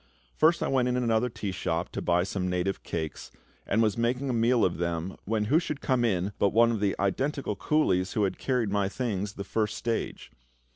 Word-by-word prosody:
First 165 +2 +3
I - - 0
went 130 -2 +2
into 125 0 0
another 115 +1 +2
tea 105 -3 -4
shop 85 -2 -2
to - - -5
buy 90 0 +2
some 90 -1 -2
native 90 +1 -1
cakes, 80 -2 -5 0.4
and 115 - +3
was 110 0 +1
making 125 +3 0
a - - -1
meal 115 0 +3
of 85 -2 -1
them 85 +1 -2
when 110 0 0
who 150 +9 +4
should 150 -4 -4
come 130 -4 +1
in 100 -3 0
but 100 - +4
one 115 +3 +4
of 110 - -1
the 100 -1 +1
identical 130 +4 -1
coolies 95 -5 +1
who 105 - +1
had 95 -2 -1
carried 125 -6 0
my 100 -1 +1
things 105 -4 -2
the 100 - -6
first 105 +1 -1
stage. 115 -1 -3
105 Hz, 210 wpm, -28 LUFS, 95-125 Hz, 0.4 s, who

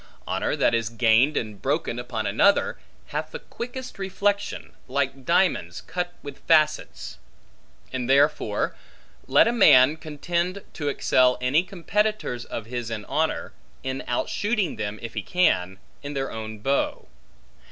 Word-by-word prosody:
Honor - - -1
that - - +2
is 115 -1 0
gained 115 +5 +3
and 105 -3 -4
broken 135 -4 -1
upon 120 -3 -4
another, 115 - +3 0.3
hath - - -3
the - - -6
quickest 250 -1 -8
reflection, 200 +1 -1
like 135 0 -2
diamonds 180 +2 +1
cut 175 -1 -4
with 145 -1 -8
facets. 155 -2 +1 0.7
And 130 -1 -3
therefore, 140 -6 +2 0.5
let 140 +10 +5
a - - +3
man 150 - +6
contend 170 +5 -3
to 145 -3 -2
excel 125 -2 +3
any 130 +6 +3
competitors 190 - -1
of 115 - -6
his 120 0 -4
in 110 -2 -5
honor, - - -1 0.3
in 130 0 -3
outshooting 205 - -1
them, 105 0 -3
if 115 0 -6
he - - -2
can, 95 - +1 0.2
in 145 0 -6
their 135 -1 -2
own 110 -1 -6
bow. 135 +7 -1
140 Hz, 140 wpm, -25 LUFS, 120-180 Hz, 0.7 s, man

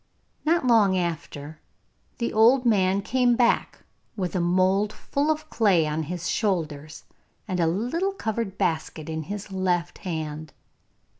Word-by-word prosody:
Not 325 -2 +2
long 215 -6 +4
after 155 -3 -4 0.6
the 235 - -2
old 240 +4 +5
man 195 -3 +2
came 245 0 +2
back 240 -1 +1 0.3
with 185 -3 -3
a - - +1
mould 185 +4 +2
full 285 +7 -2
of 310 0 -1
clay 195 -8 +3
on 155 +1 -1
his 175 +3 -4
shoulders, 155 -7 -2 0.4
and 185 -3 -2
a 165 - +3
little 250 - -1
covered 220 - -3
basket 160 -1 -2
in 160 0 -3
his 200 +5 -7
left 180 -2 -1
hand. 155 -3 -5
190 Hz, 140 wpm, -25 LUFS, 165-230 Hz, 0.6 s, old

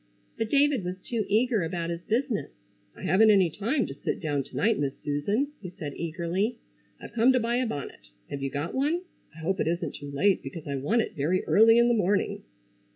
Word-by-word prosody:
But 225 - -2
David 280 -5 +3
was 180 +1 -4
too 220 +2 -3
eager 225 +1 +2
about 170 0 -2
his 170 0 -4
business. 235 +3 -1 0.5
"I - - -11
haven't 205 +6 +5
any 190 -5 +5
time 230 - 0
to 135 - -6
sit 140 - -3
down 145 -4 -1
to - - -14
night, 225 -3 +2
Miss 140 -1 -2
Susan," 180 - -1
he 180 - -6
said 150 -5 -7
eagerly, 175 +7 -2 0.4
"I've - - -10
come 240 +2 +5
to 255 - +3
buy 235 +1 0
a 255 -1 +1
bonnet. 135 - -6 0.2
Have 140 - -4
you 135 - -1
got 145 +5 -4
one? 300 +6 +1 0.3
I - - -14
hope 190 +4 -1
it - - +1
isn't 170 +1 -1
too 145 - -8
late 185 +8 +2
because 165 -4 -8
I 140 - -2
want 215 - +1
it - - -7
very 160 +6 0
early 225 +2 +6
in 235 0 +5
the 240 - +3
morning." 205 -2 +1
190 Hz, 220 wpm, -27 LUFS, 160-230 Hz, 0.5 s, early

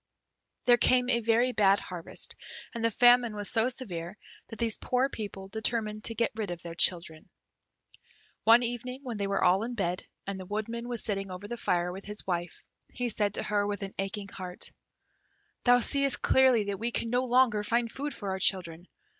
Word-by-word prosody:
There 245 -1 +6
came 250 +1 +3
a 235 - +2
very 230 +2 +2
bad 200 -3 +4
harvest, 175 -2 -3 0.4
and 230 -2 -4
the 230 - +4
famine 245 0 +5
was 205 -2 0
so 225 +2 +2
severe 195 -7 -5 0.3
that 225 - -9
these 230 -2 0
poor 255 +2 +1
people 200 -5 -7
determined 215 0 -1
to 230 - +2
get 230 - +1
rid 215 -3 -4
of 175 -1 -5
their 170 -1 -7
children. 165 -2 +1 1.1
One 230 +2 +6
evening, 245 +2 -4
when 240 -5 -5
they 200 -1 -1
were 200 0 0
all 185 +2 +4
in 240 +2 -4
bed, 180 -4 -2 0.2
and 195 -1 -4
the 185 - -8
Woodman 230 +3 -4
was 240 -2 -4
sitting 195 -2 -3
over 185 +2 -7
the 240 - -4
fire 180 -5 0
with 190 +2 -8
his 210 +1 -5
wife, 175 -2 -3 0.3
he 245 -1 -2
said 205 -2 0
to - - -1
her, 205 -1 0
with 205 0 -3
an 195 - -6
aching 195 +1 -3
heart, 180 -2 -7 0.9
"Thou 245 0 +6
seest 275 +1 +2
clearly 260 -4 +5
that 200 -1 -4
we 230 +2 -1
can 230 -1 -2
no 250 +1 +2
longer 245 -4 +3
find 230 +2 0
food 290 +2 -4
for 200 -7 -5
our 190 - -3
children. 175 -2 0
215 Hz, 195 wpm, -29 LUFS, 195-240 Hz, 1.1 s, There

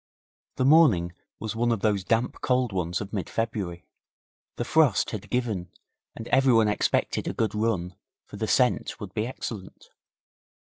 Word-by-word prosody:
The 130 - 0
morning 125 - +5 0.3
was 110 -1 -4
one 120 +1 +1
of 115 -4 -1
those 105 -3 +1
damp 115 +4 0
cold 125 -4 +1
ones 90 -1 -2
of 100 +1 -7
mid 95 -5 -3
February; 100 -6 -3 0.7
the 120 - -3
frost 150 -6 +3
had 105 -1 -6
given 110 -8 -2 0.5
and 115 - -8
everyone 125 -5 +4
expected 105 - 0
a - - -2
good 110 - -1
run, 105 -5 -1 0.3
for - - -11
the - - -2
scent - - +1
would - - -8
be 110 +2 -1
excellent. 465 - -8
110 Hz, 155 wpm, -26 LUFS, 95-120 Hz, 0.7 s, morning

